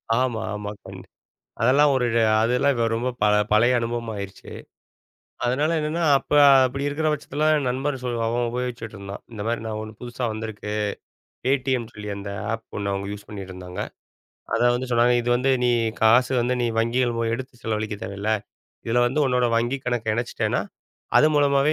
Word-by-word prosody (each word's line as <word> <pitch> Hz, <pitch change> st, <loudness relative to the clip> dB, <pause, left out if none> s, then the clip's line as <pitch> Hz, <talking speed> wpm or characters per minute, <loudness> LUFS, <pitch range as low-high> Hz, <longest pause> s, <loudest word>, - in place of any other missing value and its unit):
ஆமா, 125 Hz, -3 st, 0 dB
ஆமா. 105 Hz, 0 st, -5 dB
கண் -, -, -9 dB, 0.6 s
அதெல்லாம் 140 Hz, +5 st, +5 dB
ஒரு 125 Hz, -2 st, +1 dB
அ -, -, +4 dB, 0.2 s
அதெல்லாம் 125 Hz, +3 st, +2 dB, 0.2 s
ரொம்ப 120 Hz, +3 st, -1 dB, 0.4 s
பழய 120 Hz, +4 st, +5 dB
அனுபவமாயிருச்சு. 115 Hz, -4 st, -5 dB, 1.0 s
அதனால 145 Hz, +6 st, +1 dB
என்னன்னா 155 Hz, +3 st, -1 dB
அப்ப 150 Hz, -, -6 dB, 0.3 s
அப்படி 135 Hz, +2 st, -3 dB
இருக்கிற 155 Hz, +2 st, -1 dB
பட்சத்தில 150 Hz, +1 st, -1 dB
என் 140 Hz, -4 st, 0 dB
நண்பர் 135 Hz, +2 st, -1 dB
சொ 125 Hz, -, -2 dB, 0.2 s
அவன் 120 Hz, +1 st, 0 dB
உபயோகிச்சிட்டு 120 Hz, -3 st, -4 dB
இருந்தான். 100 Hz, 0 st, -8 dB
இந்த 110 Hz, -2 st, -7 dB
மாரி 115 Hz, -1 st, -1 dB
நான் 110 Hz, -1 st, -3 dB
ஒண்ணு 110 Hz, 0 st, -8 dB
புதுசா 120 Hz, +1 st, -6 dB
வந்திருக்கு. 110 Hz, -1 st, -6 dB, 0.8 s
Paytmன்னு 130 Hz, -3 st, 0 dB
சொல்லி 105 Hz, 0 st, -7 dB
அந்த 100 Hz, 0 st, -6 dB, 0.2 s
ஆப் 115 Hz, 0 st, -4 dB
ஒண்ணு 100 Hz, 0 st, -2 dB
அவங்க 100 Hz, 0 st, -3 dB
யூஸ் 105 Hz, 0 st, -9 dB
பண்ணிட்டு 95 Hz, -3 st, -7 dB
இருந்தாங்க. 90 Hz, 0 st, -7 dB, 0.7 s
அத -, -, +1 dB
வந்து 125 Hz, +1 st, -4 dB
சொன்னாங்க. 120 Hz, +1 st, +4 dB
இது 120 Hz, -, -2 dB
வந்து 130 Hz, +2 st, +2 dB
நீ 125 Hz, -, +3 dB, 0.3 s
காசு 120 Hz, +4 st, +5 dB
வந்து 125 Hz, +1 st, 0 dB
நீ -, -, +1 dB
வங்கிகள் 120 Hz, +1 st, +1 dB, 0.2 s
எடுத்துச் 125 Hz, 0 st, -6 dB
செலவழிக்க 110 Hz, -1 st, -2 dB
தேவயில்ல. 100 Hz, +1 st, -3 dB, 0.6 s
இதுல 120 Hz, +2 st, +2 dB
வந்து 135 Hz, +5 st, 0 dB
உன்னோட 125 Hz, -1 st, +2 dB
வங்கி 120 Hz, +4 st, +1 dB
கணக்கு 115 Hz, -3 st, 0 dB
இணச்சிட்டேன்னா 120 Hz, +1 st, -1 dB, 0.6 s
அது 155 Hz, -, +7 dB
மூலமாவே 140 Hz, +1 st, +3 dB
120 Hz, 160 wpm, -24 LUFS, 110-130 Hz, 1.0 s, அது